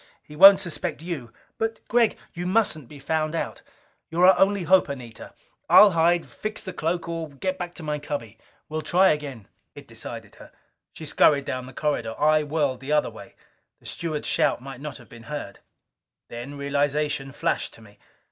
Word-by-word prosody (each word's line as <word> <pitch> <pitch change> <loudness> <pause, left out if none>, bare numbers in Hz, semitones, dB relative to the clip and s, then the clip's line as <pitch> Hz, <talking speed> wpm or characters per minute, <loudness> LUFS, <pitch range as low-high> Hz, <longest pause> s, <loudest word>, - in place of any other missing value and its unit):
He 150 - -13
won't 195 +5 +9
suspect 170 -2 -4
you!" 150 -10 -5 0.3
"But, 225 0 -1
Gregg 235 -2 +2
" - - -34
"You 175 +1 -4
mustn't 185 - +1
be 150 - -12
found 155 +2 -1
out. - - -4 0.5
You're 175 +2 +3
our 190 - +6
only 195 -1 +3
hope, 185 -1 +4
Anita! 125 -5 -8 0.3
I'll 205 -1 +9
hide, 170 +1 +2
fix 215 0 -6
the 185 - -6
cloak, 170 0 -2
or 165 -2 -4
get 185 +7 -4
back 175 -1 -5
to 165 - -8
my 150 -1 -2
cubby. 115 -7 -6 0.3
We'll 155 +1 -3
try 180 +5 +4
again." 140 -8 -3 0.3
It - - -12
decided - - -9
her. - - -14 0.4
She 160 - -10
scurried 145 -1 +3
down 130 0 -4
the - - -10
corridor. 125 -5 -2
I 155 +1 +4
whirled 145 -4 -1
the 135 +2 -6
other 150 0 +2
way. - - -13 0.4
The - - -25
steward's 155 -3 -4
shout - - +2
might 135 0 -10
not 150 -1 -6
have 120 - -16
been 115 -1 -13
heard. 145 -9 -6 0.7
Then 120 +5 -7
realization 140 0 -1
flashed 140 - -1
to - - -17
me. 105 -1 -18
150 Hz, 185 wpm, -25 LUFS, 140-175 Hz, 0.7 s, won't